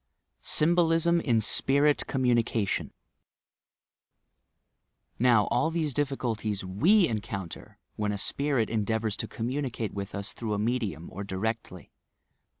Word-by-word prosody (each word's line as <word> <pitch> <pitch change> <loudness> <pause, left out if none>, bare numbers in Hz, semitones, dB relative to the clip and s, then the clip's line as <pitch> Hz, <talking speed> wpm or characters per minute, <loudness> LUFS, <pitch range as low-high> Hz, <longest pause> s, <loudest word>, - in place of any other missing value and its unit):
SYHBOUSM 170 +1 +3
IN 120 -7 +2
SPIRIT 140 +6 +3
COMMUNICATION 120 -5 0 2.3
Now, 120 -3 +5
all 140 +7 +2
these 160 -4 -1
difficulties 120 -8 -2
we 170 - +4
encounter 100 -5 -6 0.2
when 105 -1 -1
a 100 - -3
spirit 135 +1 +1
endeavours 110 -1 -1
to - - -3
communicate 120 -2 -3
with 100 0 -5
us 100 +2 -4
through 110 -3 -3
a - - -2
medium, 105 -7 -2
or 100 - -6
directly. 100 -1 -4
115 Hz, 110 wpm, -28 LUFS, 105-140 Hz, 2.3 s, Now